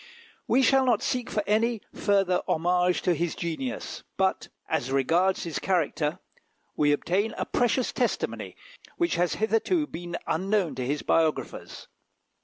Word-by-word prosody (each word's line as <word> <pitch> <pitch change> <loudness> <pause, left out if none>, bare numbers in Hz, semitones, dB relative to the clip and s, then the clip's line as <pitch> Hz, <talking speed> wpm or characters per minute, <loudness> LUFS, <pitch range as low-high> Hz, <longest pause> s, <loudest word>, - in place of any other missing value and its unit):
We 265 - +4
shall 270 0 +5
not 240 -5 +2
seek 250 -2 -1
for 210 - -1
any 225 +2 +1
further 195 -3 +2
homage 180 +2 +1
to 180 - +3
his 170 +1 -2
genius; 170 +10 -4 0.2
but, 190 0 +1 0.2
as 130 - -1
regards 165 +8 +2
his 165 -3 -3
character, 160 -4 0 0.6
we 145 -1 +3
obtain 185 +8 0
a - - -1
precious 245 +1 +1
testimony, - - -2 0.4
which 345 -1 +1
has 175 0 +1
hitherto 225 - +1
been 175 - -6
unknown 190 -1 0
to 130 -1 -4
his 145 +2 -1
biographers. 160 -2 -1
185 Hz, 140 wpm, -27 LUFS, 165-225 Hz, 0.6 s, shall